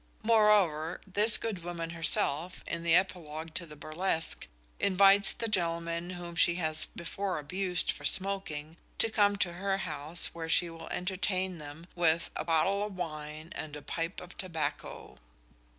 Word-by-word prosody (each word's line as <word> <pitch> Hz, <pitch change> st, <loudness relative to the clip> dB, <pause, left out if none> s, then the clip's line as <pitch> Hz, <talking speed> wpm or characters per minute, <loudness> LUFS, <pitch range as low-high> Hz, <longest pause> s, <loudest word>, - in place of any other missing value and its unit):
Moreover, 205 Hz, -8 st, +4 dB
this 210 Hz, +3 st, +5 dB
good 210 Hz, -7 st, -4 dB
woman 170 Hz, -1 st, -4 dB
herself, 165 Hz, +1 st, -1 dB
in 170 Hz, -, -3 dB
the 170 Hz, 0 st, +4 dB
epilogue 165 Hz, -4 st, -1 dB
to 170 Hz, 0 st, -4 dB
the 150 Hz, -, -11 dB
burlesque, 160 Hz, +2 st, -3 dB, 0.3 s
invites 195 Hz, +1 st, +6 dB
the 230 Hz, -, -3 dB
gentlemen 170 Hz, -3 st, -1 dB
whom 175 Hz, -1 st, -7 dB
she 170 Hz, +1 st, +4 dB
has 155 Hz, -3 st, +1 dB
before 185 Hz, +2 st, -4 dB
abused 180 Hz, +3 st, 0 dB
for -, -, -10 dB
smoking, 165 Hz, -3 st, -1 dB, 0.2 s
to 225 Hz, -, +2 dB
come 205 Hz, -2 st, +3 dB
to 180 Hz, -3 st, 0 dB
her 195 Hz, +2 st, -1 dB
house 160 Hz, -2 st, -1 dB
where 165 Hz, -1 st, -5 dB
she 170 Hz, +1 st, +4 dB
will 165 Hz, -, -9 dB
entertain 185 Hz, -1 st, -1 dB
them 150 Hz, +2 st, -9 dB
with 165 Hz, -1 st, +2 dB
"a -, -, -2 dB
pottle 170 Hz, +5 st, +2 dB
of 210 Hz, -2 st, -5 dB
wine, 155 Hz, -2 st, -6 dB
and 150 Hz, -1 st, -6 dB
a 150 Hz, -, -9 dB
pipe 165 Hz, +2 st, -3 dB
of 180 Hz, -, -11 dB
tobacco." 165 Hz, -, -4 dB
170 Hz, 155 wpm, -31 LUFS, 160-190 Hz, 0.3 s, invites